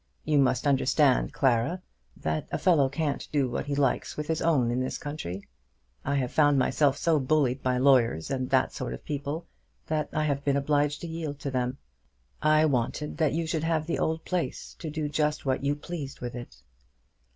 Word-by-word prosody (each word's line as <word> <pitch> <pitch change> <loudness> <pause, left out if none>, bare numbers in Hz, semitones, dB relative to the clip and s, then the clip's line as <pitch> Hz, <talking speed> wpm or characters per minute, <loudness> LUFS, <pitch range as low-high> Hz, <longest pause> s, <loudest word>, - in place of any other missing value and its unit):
You 150 -2 +3
must 135 0 +2
understand, 95 - +3
Clara, 130 +7 +1 0.4
that 80 0 -2
a - - 0
fellow 160 -7 +3
can't 145 0 -2
do 140 -3 +2
what 120 - -3
he 145 - -1
likes 140 -2 0
with 150 - -2
his 160 -1 -1
own 135 -8 +2
in 120 - 0
this 130 0 -2
country. 100 - -6 0.6
I 140 - -1
have 130 -3 0
found 145 -2 +4
myself 140 +1 +2
so 160 0 +2
bullied 135 -2 +1
by 125 -1 +1
lawyers 125 - +3
and 130 -1 -2
that 130 -1 +2
sort 60 - -4
of - - -14
people, 145 +3 -4 0.4
that 155 -1 -1
I 155 - 0
have 140 -2 -1
been 140 -1 +2
obliged 145 +1 +1
to 170 - -5
yield 160 -3 -4
to 140 - -3
them. 125 0 -1 0.6
I 155 0 +4
wanted 145 +2 -1
that 155 -3 +2
you 165 +1 -1
should 160 -1 -2
have 160 -1 0
the 170 - -2
old 160 0 -1
place, 180 -2 -3
to 160 - -5
do 150 0 -2
just 150 +1 -1
what 130 0 0
you 140 +1 +1
pleased 145 -2 -7
with 120 -1 -5
it." 120 0 -9
145 Hz, 195 wpm, -27 LUFS, 130-155 Hz, 0.6 s, found